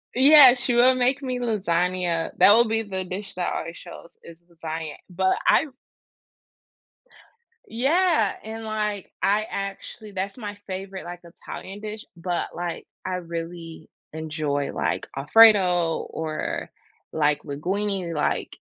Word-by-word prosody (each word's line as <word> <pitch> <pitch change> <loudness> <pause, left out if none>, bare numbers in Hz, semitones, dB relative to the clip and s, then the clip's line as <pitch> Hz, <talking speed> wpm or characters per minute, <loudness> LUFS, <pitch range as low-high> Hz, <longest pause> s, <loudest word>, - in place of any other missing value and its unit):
Yeah, 270 -1 +9
she 245 0 -1
will 250 +2 +5
make 255 +3 +1
me 255 -2 -3
lasagna 180 -6 -1
that 205 - +8
will 235 +2 +5
be 225 0 0
the 190 -2 -4
dish 190 +2 -6
that 180 - -2
already 165 - -4
shows 175 -1 -12
is 170 0 -13
lasagna, 160 -2 -6
but 190 +1 +1
I 310 - +4 2.0
Yeah, 275 - +1
and, 225 +1 -7
like, 210 -2 -3
I 210 +2 +2
actually 200 +2 -6
that's 195 +4 -4
my 205 -3 -6
favorite, 190 0 -6
like, 175 0 -8
Italian 190 +3 -10
dish, 215 0 -7
but, 175 0 -3
like, 175 -1 -5 0.2
I 185 - -2
really 165 -2 -7 0.2
enjoy, 150 -3 -3
like, 90 +3 -2
Alfredo 180 0 +5
or, 155 -1 -4 0.4
like, 150 -1 +1
linguine. 185 +4 -2
Like, 150 - -1
190 Hz, 130 wpm, -24 LUFS, 165-220 Hz, 2.0 s, Yeah